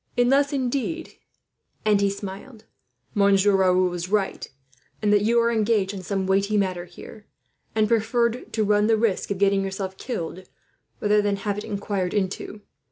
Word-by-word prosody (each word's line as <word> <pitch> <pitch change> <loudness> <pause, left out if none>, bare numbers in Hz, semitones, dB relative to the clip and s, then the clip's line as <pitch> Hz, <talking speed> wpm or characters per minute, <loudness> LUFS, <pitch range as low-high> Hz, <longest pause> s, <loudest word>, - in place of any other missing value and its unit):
"Unless, 275 +4 +3
indeed," 275 +4 -2 0.7
and 210 -2 +3
he 200 - +3
smiled, 205 +4 -8 0.5
"Monsieur 200 -1 +4
Raoul 185 -1 +3
was 175 0 -4
right, 200 -1 -1 0.5
and 210 -1 +2
that 205 - +4
you 230 +3 +3
are 235 0 +2
engaged 215 -3 +1
on 195 - -6
some 195 +1 -2
weighty 200 +2 +1
matter 185 -3 -1
here, 190 +4 -13 0.5
and 215 -1 +3
preferred 235 +2 0
to 220 - +1
run 210 0 +3
the 225 -1 +3
risk 215 -3 0
of 200 - -2
getting 195 0 +2
yourself 190 -1 -4
killed 185 -6 -5 0.5
rather 210 0 +3
than 205 -1 0
have 200 +1 -3
it - - -6
inquired 200 -2 -3
into. 205 +1 -3
205 Hz, 165 wpm, -24 LUFS, 195-225 Hz, 0.7 s, Monsieur